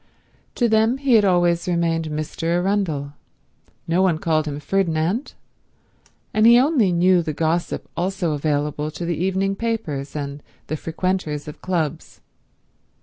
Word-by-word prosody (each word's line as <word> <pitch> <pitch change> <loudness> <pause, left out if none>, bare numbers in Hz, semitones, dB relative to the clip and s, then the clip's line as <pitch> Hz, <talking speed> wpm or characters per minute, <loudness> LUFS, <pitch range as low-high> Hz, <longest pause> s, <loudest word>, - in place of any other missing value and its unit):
To 240 - +2
them 220 +3 +3
he 270 -2 +1
had 220 -2 +6
always 175 -3 +2
remained 170 -2 0
Mr. 155 +1 -4
Arundel; 170 -5 0 0.7
no 170 +3 +2
one 185 -4 +3
called 155 -1 0
him 145 -1 -4
Ferdinand; 180 - -1 1.0
and 215 +1 +4
he 235 +1 +8
only 255 - +3
knew 175 +1 +4
the 160 -2 -3
gossip 165 +3 -1
also 180 -1 -1
available 150 0 -1
to 155 +3 -6
the 170 0 -1
evening 190 +1 0
papers 195 -12 -3
and 140 -1 -5 0.2
the 155 - -3
frequenters 165 -2 -2
of 150 - -9
clubs. 170 -5 -3
170 Hz, 140 wpm, -22 LUFS, 155-195 Hz, 1.0 s, he